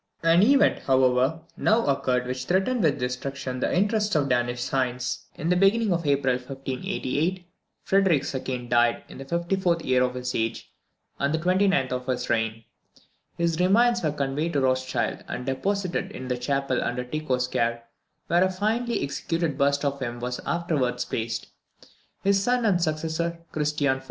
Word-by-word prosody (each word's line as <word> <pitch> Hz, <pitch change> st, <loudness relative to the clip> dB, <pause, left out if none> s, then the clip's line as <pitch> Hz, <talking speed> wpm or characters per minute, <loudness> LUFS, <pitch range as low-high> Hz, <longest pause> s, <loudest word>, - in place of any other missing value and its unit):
An 165 Hz, +2 st, +5 dB
event, 275 Hz, +6 st, +4 dB
however, 130 Hz, +3 st, +3 dB
now 225 Hz, +2 st, +2 dB
occurred 130 Hz, -3 st, +1 dB
which 130 Hz, 0 st, -4 dB
threatened 195 Hz, -, +1 dB
with 155 Hz, -6 st, +2 dB
destruction 125 Hz, +1 st, -4 dB
the -, -, 0 dB
interests 210 Hz, +2 st, +1 dB
of 145 Hz, -2 st, +2 dB
Danish 120 Hz, -1 st, 0 dB
science. 130 Hz, -1 st, -2 dB
In 160 Hz, -, -3 dB
the 180 Hz, -, +4 dB
beginning 195 Hz, +2 st, +3 dB
of 170 Hz, -3 st, -2 dB
April 135 Hz, -3 st, +2 dB
1588, 140 Hz, +6 st, -3 dB, 0.4 s
Frederick 190 Hz, -7 st, +3 dB
II. 130 Hz, -2 st, -3 dB
died 120 Hz, 0 st, +2 dB
in -, -, -10 dB
the 135 Hz, -, -7 dB
54th 170 Hz, +2 st, 0 dB
year 130 Hz, 0 st, +3 dB
of 125 Hz, 0 st, 0 dB
his 125 Hz, 0 st, -3 dB
age, 115 Hz, 0 st, -3 dB, 0.5 s
and 140 Hz, +1 st, +1 dB
the 160 Hz, -, +1 dB
29th 180 Hz, -5 st, +2 dB
of 125 Hz, 0 st, -3 dB
his 130 Hz, -2 st, -1 dB
reign. 115 Hz, -1 st, 0 dB, 0.7 s
His 170 Hz, -1 st, 0 dB
remains 235 Hz, +6 st, +4 dB
were 155 Hz, -, 0 dB
conveyed 145 Hz, +3 st, -2 dB
to 140 Hz, -, +1 dB
Rothschild, 130 Hz, 0 st, 0 dB
and 125 Hz, -, -5 dB
deposited 185 Hz, +7 st, -1 dB
in 130 Hz, 0 st, -7 dB
the 125 Hz, -, 0 dB
chapel 135 Hz, 0 st, 0 dB
under 125 Hz, +1 st, -2 dB
Tycho's 130 Hz, -2 st, -1 dB
care, 115 Hz, -1 st, -1 dB, 0.4 s
where 175 Hz, +2 st, +3 dB
a 185 Hz, -, +2 dB
finely 225 Hz, +5 st, -1 dB
executed 150 Hz, +2 st, -2 dB
bust 140 Hz, +1 st, +1 dB
of 140 Hz, 0 st, -1 dB
him 120 Hz, -2 st, -4 dB
was 125 Hz, +1 st, -3 dB
afterwards 140 Hz, -8 st, 0 dB
placed. 115 Hz, -1 st, -3 dB, 0.7 s
His 195 Hz, 0 st, +3 dB
son 245 Hz, +2 st, +1 dB
and 185 Hz, -5 st, +3 dB
successor, 165 Hz, +1 st, -1 dB
Christian 150 Hz, -3 st, 0 dB
IV. -, -, -9 dB
140 Hz, 165 wpm, -25 LUFS, 125-175 Hz, 0.7 s, An